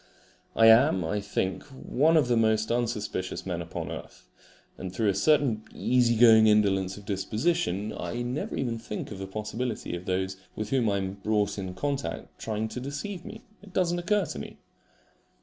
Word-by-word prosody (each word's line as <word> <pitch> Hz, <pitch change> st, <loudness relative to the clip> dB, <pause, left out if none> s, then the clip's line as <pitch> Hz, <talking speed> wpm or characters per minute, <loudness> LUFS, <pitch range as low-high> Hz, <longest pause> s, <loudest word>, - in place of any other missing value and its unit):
I 115 Hz, -, +5 dB
am, 110 Hz, -, +6 dB
I 105 Hz, +6 st, -1 dB
think, 95 Hz, -2 st, -2 dB
one 145 Hz, +3 st, +1 dB
of 145 Hz, -5 st, +3 dB
the 120 Hz, -, +2 dB
most 110 Hz, -1 st, +2 dB
unsuspicious 115 Hz, -6 st, -2 dB
men 90 Hz, -2 st, -3 dB
upon 85 Hz, -, -5 dB
earth, -, -, -9 dB, 0.5 s
and 95 Hz, -, -6 dB
through 105 Hz, +3 st, +1 dB
a -, -, +2 dB
certain 130 Hz, +1 st, +2 dB
easy 125 Hz, -2 st, +3 dB
going 110 Hz, -1 st, +7 dB
indolence 95 Hz, -3 st, +2 dB
of 100 Hz, -, -12 dB
disposition 105 Hz, -, -1 dB
I 120 Hz, +1 st, -4 dB
never 125 Hz, +4 st, -3 dB
even 120 Hz, -3 st, -2 dB
think 110 Hz, -1 st, -6 dB
of 100 Hz, -, -7 dB
the 95 Hz, -, -5 dB
possibility 110 Hz, +2 st, -4 dB
of 90 Hz, +1 st, -7 dB
those 95 Hz, +1 st, -1 dB, 0.2 s
with 110 Hz, 0 st, -4 dB
whom 125 Hz, -5 st, +2 dB
I 100 Hz, -, +1 dB
am 95 Hz, -1 st, -2 dB
brought 105 Hz, -2 st, +1 dB
in 95 Hz, -1 st, -5 dB
contact 140 Hz, +5 st, -4 dB
trying 110 Hz, 0 st, -2 dB
to 125 Hz, -, -5 dB
deceive 145 Hz, +8 st, -5 dB
me. 220 Hz, +1 st, -9 dB, 0.2 s
It 200 Hz, -2 st, -15 dB
does 175 Hz, -2 st, +2 dB
not 175 Hz, 0 st, -2 dB
occur 205 Hz, +1 st, +2 dB
to 70 Hz, -, -6 dB
me. -, -, -8 dB
110 Hz, 185 wpm, -28 LUFS, 100-130 Hz, 0.5 s, going